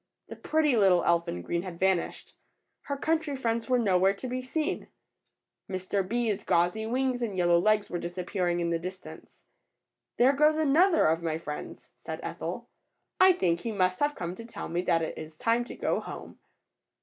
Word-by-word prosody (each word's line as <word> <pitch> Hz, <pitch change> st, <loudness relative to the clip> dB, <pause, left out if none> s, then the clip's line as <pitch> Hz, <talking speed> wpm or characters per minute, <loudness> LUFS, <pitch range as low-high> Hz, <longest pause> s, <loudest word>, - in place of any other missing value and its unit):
The -, -, -7 dB
pretty 310 Hz, -4 st, +1 dB
little 190 Hz, -5 st, +4 dB
elf 170 Hz, 0 st, +2 dB
in 90 Hz, 0 st, -4 dB
green 170 Hz, -, -1 dB
had 175 Hz, -2 st, -8 dB
vanished. 190 Hz, -2 st, 0 dB, 0.5 s
Her 280 Hz, -, -3 dB
country 315 Hz, 0 st, 0 dB
friends 230 Hz, -3 st, -2 dB
were 250 Hz, -, +4 dB
nowhere 195 Hz, -3 st, +3 dB
to 255 Hz, -, -6 dB
be 255 Hz, +1 st, -3 dB
seen. 305 Hz, +5 st, -3 dB, 0.8 s
Mr. 185 Hz, +1 st, -1 dB
Bee^s 210 Hz, 0 st, -1 dB
gauzy 180 Hz, +6 st, +1 dB
wings 255 Hz, +1 st, 0 dB
and 210 Hz, -5 st, -3 dB
yellow 175 Hz, -1 st, +4 dB
legs 210 Hz, +2 st, +2 dB
were 175 Hz, -, -4 dB
disappear 180 Hz, +2 st, -3 dB
ing 175 Hz, 0 st, 0 dB
in 170 Hz, 0 st, -1 dB
the 165 Hz, -, 0 dB
distance. 185 Hz, +2 st, -10 dB, 0.7 s
^^There 260 Hz, +3 st, +5 dB
goes 300 Hz, +2 st, +4 dB
another 315 Hz, +4 st, +4 dB
of 160 Hz, +1 st, +2 dB
my 160 Hz, -2 st, -1 dB
friends,'' 150 Hz, -2 st, -7 dB, 0.2 s
said -, -, -5 dB
Ethel. -, -, -5 dB, 0.5 s
think 355 Hz, -, +4 dB
he 230 Hz, -, -4 dB
must 185 Hz, -3 st, +1 dB
have 290 Hz, 0 st, +1 dB
come 175 Hz, 0 st, -4 dB
to 230 Hz, -, -9 dB
tell 230 Hz, -, -7 dB
me 170 Hz, +1 st, -1 dB
that 170 Hz, -2 st, +1 dB
it 160 Hz, -, -4 dB
is 155 Hz, 0 st, -9 dB
time 230 Hz, +5 st, +1 dB
to -, -, -9 dB
go -, -, 0 dB
home." -, -, -9 dB
195 Hz, 185 wpm, -28 LUFS, 175-255 Hz, 0.8 s, ^^There